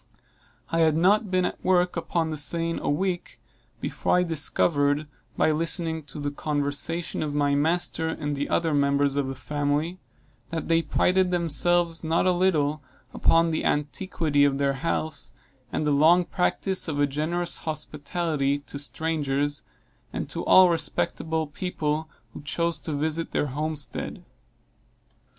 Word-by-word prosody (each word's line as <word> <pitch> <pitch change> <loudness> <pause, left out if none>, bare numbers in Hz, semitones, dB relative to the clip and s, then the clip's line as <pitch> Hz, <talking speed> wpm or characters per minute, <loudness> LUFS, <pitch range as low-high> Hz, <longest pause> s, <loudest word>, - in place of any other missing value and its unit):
I 165 - +1
had 160 -1 +3
not 200 +5 +3
been 185 -1 +1
at - - -5
work 180 -1 +2
upon 165 -1 -1
the - - -2
seine 165 +3 +3
a - - -2
week 175 +4 -2 0.4
before - - 0
I 180 - +3
discovered, 150 -2 +2 0.3
by - - +3
listening 165 +1 +1
to 145 +1 -8
the 145 0 -2
conversation 145 +3 -2
of 150 -2 -3
my 145 -1 +2
master 160 +2 0
and 145 -2 -3
the 140 +1 -3
other 165 -2 +1
members 140 0 +2
of 140 -2 0
the 135 - -4
family, 145 +5 -2 0.5
that 165 -1 -4
they 165 0 +3
prided 180 +4 +2
themselves 170 0 +2
not 165 +2 +1
a 185 - +4
little 155 -5 +1 0.3
upon 165 0 +3
the 160 - -1
antiquity 150 -1 0
of 140 -1 +2
their 140 0 +1
house, 155 +1 -2 0.4
and 155 - -1
the 150 - +2
long 165 +5 +5
practice 185 +1 0
of 145 -3 -2
a 145 - +4
generous 160 +5 -1
hospitality 150 -1 -2
to 140 0 -8
strangers, 145 -2 -2 0.5
and - - -4
to - - -3
all 185 -1 +7
respectable 160 0 -1
people 155 -1 -3 0.2
who - - -9
chose 170 +3 -1
to 160 - -4
visit 155 +3 -1
their - - +1
homestead. 150 -4 -4
155 Hz, 150 wpm, -25 LUFS, 145-170 Hz, 0.5 s, all